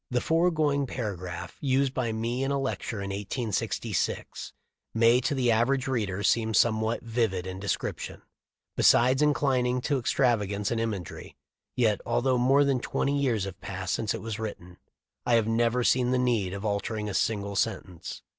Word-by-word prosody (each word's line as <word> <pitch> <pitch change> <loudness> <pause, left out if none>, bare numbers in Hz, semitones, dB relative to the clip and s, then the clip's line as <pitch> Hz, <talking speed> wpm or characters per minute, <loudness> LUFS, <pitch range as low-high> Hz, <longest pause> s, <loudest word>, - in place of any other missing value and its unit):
The 125 - +1
foregoing 155 -3 +1
paragraph, 90 -7 -5
used 135 -1 +1
by 120 -4 -1
me 115 +4 -2
in 135 - -1
a 140 0 0
lecture 120 -5 -3
in 100 - -4
1866, 105 +2 -3 0.4
may 115 +2 +5
to 145 +3 -1
the 125 -3 +2
average 130 +4 +2
reader 105 -6 -1
seem 110 -1 +2
somewhat 110 0 +2
vivid 110 -6 -1
in 95 0 -6
description, 100 +1 -4 0.5
besides 130 +3 +4
inclin 140 -4 +2
ing 125 0 0
to 140 +1 0
extravagance 105 -6 +1
in 115 - 0
imagery, 105 -6 -5 0.4
yet 110 -4 +2
although 125 +2 +1
more 135 +3 +4
than 135 -2 +1
twenty 140 +3 -1
years 125 -8 +1
have 95 -1 -7
passed 95 0 -4
since 110 -3 -1
it - - -6
was 110 -1 -4
written 90 -5 -7 0.5
I 120 - +3
have 115 -2 +2
never 120 +2 +1
seen 125 0 +3
the 130 - +2
need 120 -7 +1
of 100 +2 -6
altering 105 +1 -2
a 100 - -4
single 100 -2 -1
sen 105 -1 0
tence. 90 -3 -9
115 Hz, 170 wpm, -27 LUFS, 105-130 Hz, 0.5 s, may